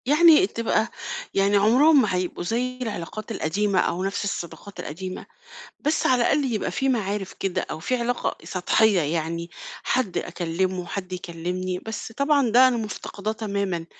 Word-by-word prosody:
يعني 320 +5 +6
تبقى 230 - 0 0.5
يعني 200 +1 +3
عمرهم 265 +9 +6
ما 210 -6 0
هيبقوا 180 -1 -2
زي 250 +6 -1
العلاقات 215 -1 -5
القديمة 200 +1 0
أو 180 +2 0
نفس 195 +2 -2
الصداقات 195 +1 -5
القديمة، 185 +5 -6 0.6
بس 300 +2 +1
على 250 -2 +4
الأقل 275 0 +2
يبقى 215 - -1
في 270 - -1
معارف 205 -5 -1
كده 195 -2 -2
أو - - -4
في 255 +10 -1
علاقة 240 0 -1
سطحية 195 +2 +3
يعني، 165 +2 -2 0.3
حد 245 -8 0
أكلمه، 180 +1 -2
حد 185 -1 -5
يكلمني، 180 +1 -3
بس 220 +2 -6
طبعًا 280 0 +2
ده 255 +3 +7
أنا 250 - 0
مفتقداه 215 -1 -4
تمامًا 200 -6 -2
205 Hz, 150 wpm, -24 LUFS, 180-245 Hz, 0.6 s, ده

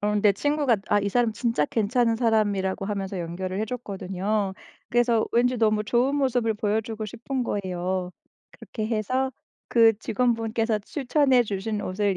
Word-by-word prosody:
어 210 0 0
근데 210 0 +4
친구가 290 +2 +1
아 205 - +3
이 200 - -1
사람 235 +1 +1
진짜 230 - 0
괜찮은 230 - +1
사람이라고 205 -5 +1
하면서 195 -2 -3
연결을 180 +2 -4
해 - - +1
줬거든요. 200 -3 -3 0.4
그래서 240 -2 +2
왠지 245 +2 +3
너무 215 -2 +2
좋은 240 +6 +1
모습을 250 -5 +1
보여 210 0 0
주고 220 0 -6
싶은 250 +5 -4
거예요. 185 -3 -2 0.4
그렇게 215 -2 -6
해서 255 +4 -1 0.4
그 225 -3 +5
직원분께서 225 -1 0
추천해 265 +2 +2
주신 210 0 -3
옷을 195 +1 0
220 Hz, 345 characters per minute, -25 LUFS, 200-240 Hz, 0.4 s, 그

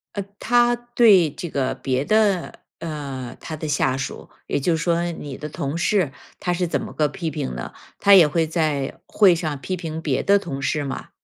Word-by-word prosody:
呃， 200 - -2 0.2
他 240 0 +3
对 235 -8 +4
这 175 - -6
个 135 -3 -1
别 130 0 -1
的， 210 -4 +1 0.2
呃， 140 -6 -5
他 160 - -6
的 155 +1 -5
下 135 -2 +1
属， 130 - -6 0.2
也 - - 0
就 165 +4 +1
是 160 - -3
说 170 -1 +1
你 145 -4 -7
的 150 - -6
同 140 +2 -3
事， 175 -5 +1 0.3
他 180 - -1
是 175 0 -1
怎 - - -1
么 - - -7
个 150 -1 +2
批 175 -2 -4
评 65 - -4
的？ - - -6 0.3
他 200 - +6
也 175 -5 +8
会 160 +1 0
在 155 -4 -1
会 190 -5 +5
上 155 -4 -3
批 185 - -3
评 160 -3 -5
别 145 -5 0
的 200 0 +4
同 140 -8 -6
事 150 +2 0
吗？ 135 - -5
160 Hz, 220 characters per minute, -22 LUFS, 140-185 Hz, 0.3 s, 也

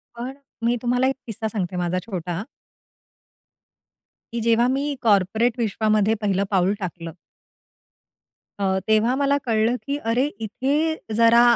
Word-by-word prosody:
पण 245 +3 -5 0.3
मी 240 +1 +3
तुम्हाला 250 +1 +2
एक 270 - 0
किस्सा 220 0 -3
सांगते 190 -4 -3
माझा 180 +1 0
छोटा 180 -3 -4 1.9
की 235 - -1
जेव्हा 230 +1 +3
मी 285 +1 -1
कॉर्पोरेट 220 +3 +2
विश्वामध्ये 215 -1 +2
पहिलं 200 -2 +1
पाऊल 190 -1 +3
टाकलं. 170 -2 -5 1.5
अ, 190 -1 +1
तेव्हा 220 +3 +3
मला 280 0 +2
कळलं, 225 +1 +2
की 280 0 -1
अरे! 240 +2 +1
इथे 280 +9 0 0.2
जरा 230 +1 +6
225 Hz, 125 wpm, -23 LUFS, 195-245 Hz, 1.9 s, जरा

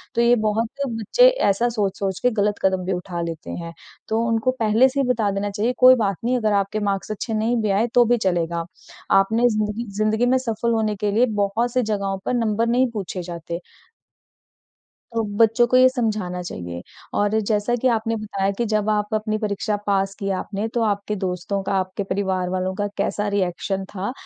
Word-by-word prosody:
तो 235 - +3
ये 240 +1 +5
बहुत 220 +2 0 0.2
बच्चे 230 - +3
ऐसा 200 - +2
सोच-सोच 195 -3 -2
के 250 - +3
गलत 210 -1 +1
कदम 190 -1 +1
भी 190 - -1
उठा 180 -1 -4
लेते 165 0 -5
हैं। 170 -1 -6 0.3
तो 220 +1 0
उनको 230 +2 +1
पहले 225 +4 +4
से 275 +2 -3
ही 275 - +2
बता 225 -5 +1
देना 200 +1 -2
चाहिए 220 +5 -1
कोई 255 0 +8
बात 200 -4 0
नहीं 250 +1 +2
अगर 215 -3 +1
आपके 200 +1 0
मार्क्स 200 0 -2
अच्छे 220 +2 -4
नहीं 220 +3 +1
भी 210 - 0
आए 210 +5 +2
तो 245 -1 +6
भी 240 +1 +3
चलेगा। 170 -4 -1 0.5
आपने 225 +5 +4
ज़िंदगी 215 +1 -2
ज़िंदगी 215 +2 +2
में 255 +1 +3
सफल 235 -2 -1
होने 215 -2 0
के 205 +1 -1
लिए 230 +4 +4 0.2
बहुत 225 +4 0
सी 255 - +2
जगहों 200 -2 -1
पर - - 0
नंबर 230 -1 +1
नहीं 250 +2 +2
पूछे 195 -4 -4
जाते। 170 0 -6 1.6
तो 225 - +1
बच्चों 225 +2 +4
को 255 - +2
ये 255 0 +7
समझाना 215 -8 -2
चाहिए। 85 - -6 0.4
और 205 +1 +2
जैसा 215 +2 0
कि 260 - +4
आपने 225 -1 0
बताया 200 -2 -2
कि 235 - +1
जब 210 0 +1
आप 210 0 0
अपनी 215 0 -1
परीक्षा 210 0 -1
पास 195 -1 +1
की 195 -1 -4
आपने, 205 +3 -3
तो 230 +1 -1
आपके 205 0 -1
दोस्तों 190 +1 -3
का, 195 - -3
आपके 185 +1 -1
परिवार 190 -2 -1
वालों, 185 0 -1
का 205 +1 -1
कैसा 205 0 -1
रिएक्शन 190 +1 -1
था। 200 +5 -3
210 Hz, 200 wpm, -22 LUFS, 195-230 Hz, 1.6 s, कोई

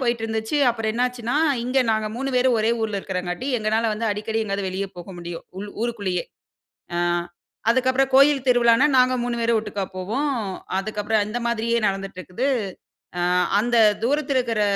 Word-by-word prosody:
போயிட்டுருந்துச்சு. 225 +1 -1
அப்பறம் 225 -2 -2
என்னாச்சுன்னா, 245 0 -1 0.3
இங்க 255 +2 +1
நாங்க 220 -1 0
3 270 +2 -2
பேரும் 250 -1 +3
ஒரே 220 +1 +1
ஊர்ல 215 -2 -1
இருக்கிறங்காட்டி, 180 +4 -4
எங்கனால 220 +1 +1
வந்து 225 +2 -2
அடிக்கடி 215 +2 -2
எங்கயாவது 200 -1 -2
வெளிய 190 +2 -3
போக 175 +1 -9
முடியும். 175 -1 -7 0.2
உள் 205 0 -6
ஊருக்குள்ளேயே. 200 -7 -2 0.7
அ - - 0 0.7
அதுக்கப்பறம் 260 +2 +2
கோயில் 275 0 +5
திருவிழானா, 245 +1 +5
நாங்க 255 0 +5
3 240 0 -2
பேரும் 230 0 +2
ஒட்டுக்கா 210 -2 -4
போவோம். 245 +11 -1 0.5
அதுக்கப்பறம், 210 +1 0
இந்த 230 - -3
மாதிரியே 235 0 0
நடந்துட்டு 195 -1 -4
இருக்குது. 210 +9 -3 0.7
அ - - 0 0.4
அந்த 240 +3 0 0.3
தூரத்துல 275 +2 +1
இருக்குற 230 -4 -1
225 Hz, 150 wpm, -23 LUFS, 205-250 Hz, 0.7 s, கோயில்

